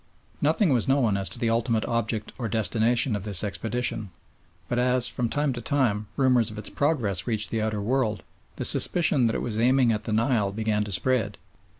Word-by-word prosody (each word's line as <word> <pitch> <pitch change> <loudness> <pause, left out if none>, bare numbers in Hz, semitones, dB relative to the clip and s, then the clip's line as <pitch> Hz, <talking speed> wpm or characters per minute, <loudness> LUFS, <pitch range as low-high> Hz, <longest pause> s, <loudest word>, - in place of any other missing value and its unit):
Nothing 155 +2 +2
was 120 -4 0
known 130 -6 +2
as 100 -1 -2
to - - -6
the 115 -1 0
ultimate 115 -1 0
object 115 -2 -2
or 115 -3 -3
destination 115 +3 +1
of 100 - -4
this 100 -3 +2
expedition, 110 +1 -3 0.6
but 120 - -1
as, 125 0 +3
from 120 0 -1
time 145 0 0
to 120 - -6
time, 115 -6 0
rumours 125 -4 +3
of 110 - -10
its 105 - -6
progress 115 - -1
reached 110 -3 -1
the 115 - -1
outer 110 -1 -2
world, 110 -4 -1 0.3
the - - -3
suspicion 160 -8 +3
that 115 - -1
it - - -2
was 110 -2 -3
aiming 125 0 +3
at 105 -1 -3
the 115 - -4
Nile 110 -2 +1
began 105 0 -1
to 105 - -7
spread. 125 +4 0
115 Hz, 200 wpm, -25 LUFS, 105-125 Hz, 0.6 s, as